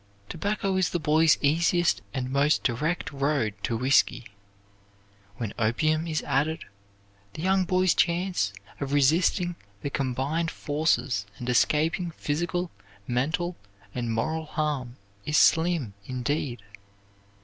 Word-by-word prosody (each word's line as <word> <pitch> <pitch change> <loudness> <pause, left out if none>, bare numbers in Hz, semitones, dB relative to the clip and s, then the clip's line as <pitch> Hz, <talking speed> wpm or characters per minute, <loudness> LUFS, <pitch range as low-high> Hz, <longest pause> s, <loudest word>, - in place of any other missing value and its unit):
Tobacco 195 +2 -1
is 185 - +2
the 175 - -1
boy's 155 +1 +4
easiest 170 +4 +2
and 130 -1 -3
most 140 +3 +2
direct 150 +9 -1
road 140 -6 0
to 115 - -1
whisky. 130 -1 +2 1.1
When 115 -4 -4
opium 155 +9 +1
is 155 -2 -1
added, 155 +4 0 0.7
the 155 - -6
young 190 -1 +2
man's 185 -1 +3
chance 175 - +1 0.3
of 140 0 -3
resisting 170 +5 +2 0.3
the 140 - -2
combined 140 +6 -1
forces 145 -10 0
and 120 - -7
escaping 155 +7 +2
physical, 175 +4 -2 0.3
mental, 160 - -1 0.4
and 120 -2 -2
moral 160 +8 -1
harm 145 -6 -2 0.3
is 150 +6 +1
slim, 160 - +3
indeed." 130 -2 -2
150 Hz, 115 wpm, -27 LUFS, 130-170 Hz, 1.1 s, boy's